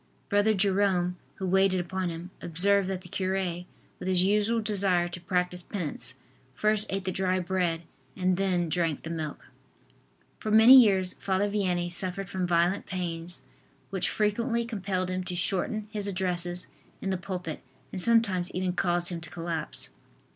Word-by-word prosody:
Brother 205 Hz, +1 st, +3 dB
Jerome, 190 Hz, -2 st, +1 dB, 0.2 s
who 190 Hz, -, -5 dB
waited 190 Hz, 0 st, +3 dB
upon 185 Hz, +1 st, -2 dB
him, 170 Hz, +2 st, -7 dB
observed 190 Hz, +4 st, +3 dB
that 190 Hz, -1 st, -3 dB
the 180 Hz, -, -12 dB
cure, 190 Hz, +1 st, -2 dB, 0.6 s
with -, -, -6 dB
his 185 Hz, -1 st, +4 dB
usual 210 Hz, +4 st, +2 dB
desire 195 Hz, -5 st, +1 dB
to 175 Hz, 0 st, -8 dB
practice 180 Hz, 0 st, 0 dB
penance, 150 Hz, -, -3 dB, 0.4 s
first 215 Hz, +10 st, +2 dB
ate 195 Hz, 0 st, -2 dB
the 185 Hz, -, -2 dB
dry 185 Hz, 0 st, 0 dB
bread 175 Hz, -2 st, -1 dB, 0.3 s
and 185 Hz, 0 st, +1 dB
then 180 Hz, -2 st, 0 dB
drank 165 Hz, -3 st, -1 dB
the 165 Hz, -, -5 dB
milk. 155 Hz, -3 st, -5 dB, 0.9 s
For 215 Hz, -, -4 dB
many 220 Hz, +4 st, +8 dB
years 195 Hz, -8 st, +7 dB
Father 195 Hz, +1 st, 0 dB
Vianney 180 Hz, -4 st, 0 dB
suffered 190 Hz, +2 st, -1 dB
from 185 Hz, -2 st, -2 dB
violent 175 Hz, +2 st, +1 dB
pains 175 Hz, -3 st, -4 dB, 0.5 s
which 190 Hz, -2 st, -1 dB
frequently 230 Hz, +3 st, 0 dB
compelled 190 Hz, -5 st, -2 dB
him 185 Hz, 0 st, -2 dB
to 180 Hz, -1 st, -4 dB
shorten 205 Hz, +4 st, 0 dB
his 205 Hz, -2 st, -2 dB
addresses 180 Hz, -2 st, -2 dB, 0.3 s
in 195 Hz, -, -3 dB
the -, -, +1 dB
pulpit 180 Hz, -4 st, -5 dB, 0.3 s
and 185 Hz, -, -3 dB
sometimes 195 Hz, -5 st, +2 dB
even 185 Hz, 0 st, -1 dB
caused 175 Hz, -1 st, 0 dB
him 170 Hz, -2 st, -5 dB
to 175 Hz, -, -9 dB
collapse. 165 Hz, -2 st, -5 dB
185 Hz, 160 wpm, -28 LUFS, 175-200 Hz, 0.9 s, many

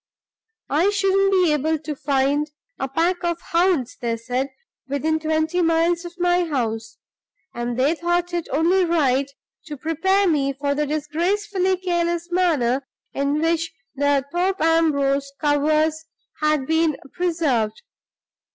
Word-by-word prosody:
I 325 Hz, +8 st, +3 dB
shouldn't 390 Hz, -1 st, +2 dB
be 365 Hz, -5 st, +3 dB
able 310 Hz, +2 st, +1 dB
to 300 Hz, 0 st, -6 dB
find 285 Hz, +1 st, 0 dB, 0.3 s
a 270 Hz, -, -1 dB
pack 335 Hz, +7 st, 0 dB
of 340 Hz, -1 st, -1 dB
hounds, 335 Hz, -7 st, 0 dB
they 230 Hz, -1 st, -1 dB
said, 250 Hz, +4 st, -2 dB, 0.4 s
within 310 Hz, +3 st, 0 dB
twenty 315 Hz, +2 st, 0 dB
miles 335 Hz, +1 st, +2 dB
of 345 Hz, 0 st, -8 dB
my 355 Hz, 0 st, +2 dB
house; 225 Hz, -7 st, -3 dB, 0.6 s
and 240 Hz, 0 st, -3 dB
they 275 Hz, +5 st, +3 dB
thought 345 Hz, +1 st, -1 dB
it 345 Hz, -2 st, -2 dB
only 340 Hz, +7 st, +3 dB
right 280 Hz, -6 st, +1 dB, 0.4 s
to 295 Hz, -2 st, -6 dB
prepare 380 Hz, +7 st, +1 dB
me 280 Hz, -4 st, +1 dB
for 280 Hz, +1 st, -1 dB
the 295 Hz, +1 st, -1 dB
disgracefully 370 Hz, +6 st, 0 dB
careless 345 Hz, -1 st, -1 dB
manner 280 Hz, -8 st, +1 dB, 0.3 s
in 280 Hz, +2 st, 0 dB
which 330 Hz, 0 st, 0 dB, 0.2 s
the 285 Hz, -1 st, +1 dB
Thorpe 370 Hz, +2 st, 0 dB
Ambrose 280 Hz, -4 st, +2 dB
covers 305 Hz, +2 st, +1 dB, 0.4 s
had 305 Hz, -3 st, +1 dB
been 320 Hz, 0 st, +1 dB, 0.2 s
preserved. 320 Hz, -, 0 dB
315 Hz, 135 wpm, -22 LUFS, 280-345 Hz, 0.6 s, I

